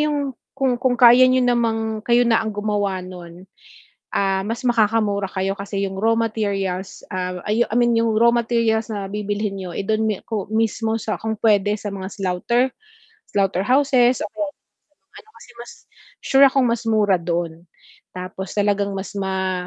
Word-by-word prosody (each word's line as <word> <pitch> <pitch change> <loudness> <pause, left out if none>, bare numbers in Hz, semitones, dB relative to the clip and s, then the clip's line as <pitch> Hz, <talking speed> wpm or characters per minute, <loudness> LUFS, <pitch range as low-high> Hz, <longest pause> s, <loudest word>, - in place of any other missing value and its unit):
yung 290 -3 0 0.2
kung 265 -3 0
kung 255 0 +1
kaya 245 +1 +7
niyo 255 0 +3
namang 225 -3 0
kayo 240 0 +4
na 230 -2 +3
ang 220 -2 -4
gumawa 205 -2 -1
no'n, 180 -1 -11 0.7
ah, 195 -1 +1
mas 230 +4 -4
makakamura 215 -4 +1
kayo 190 0 -1
kasi 200 0 -4
yung 190 - -6
raw 225 +2 +3
materials, 200 -4 -2
ah, 180 -1 -3
I 225 +3 +2
I - - -4
mean 240 -1 +3
yung 230 0 +2
raw 235 +1 +5
materials 230 -1 +1
na 200 -2 -4
bibilhin 205 -1 -3
niyo, 185 -1 -6
eh, 200 - -3
do'n 220 +1 +1
mi 215 -2 0
ko 210 -4 -4
mismo 225 0 0
sa 215 0 -3
kung 220 0 -3
puwede 205 -2 +3
sa 205 - -6
mga 190 -1 -5
slaughter, 195 +5 0 0.7
slaughter 195 -2 +1
houses 255 -2 +3
o - - -2
kaya 310 - -3
do'n 290 - -9
sa - - -58 0.3
mga - - -53
ano 435 - -14
kasi 245 - -15
mas 240 - -11 0.5
sure 270 +1 +5
akong 265 -1 +2
mas 235 -1 0
mura 205 -3 +3
don, 170 -1 -2 0.6
tapos 185 +1 -6
talagang 205 0 +1
mas 195 +1 -7
ma 190 -2 -2
215 Hz, 180 wpm, -21 LUFS, 195-235 Hz, 0.7 s, kaya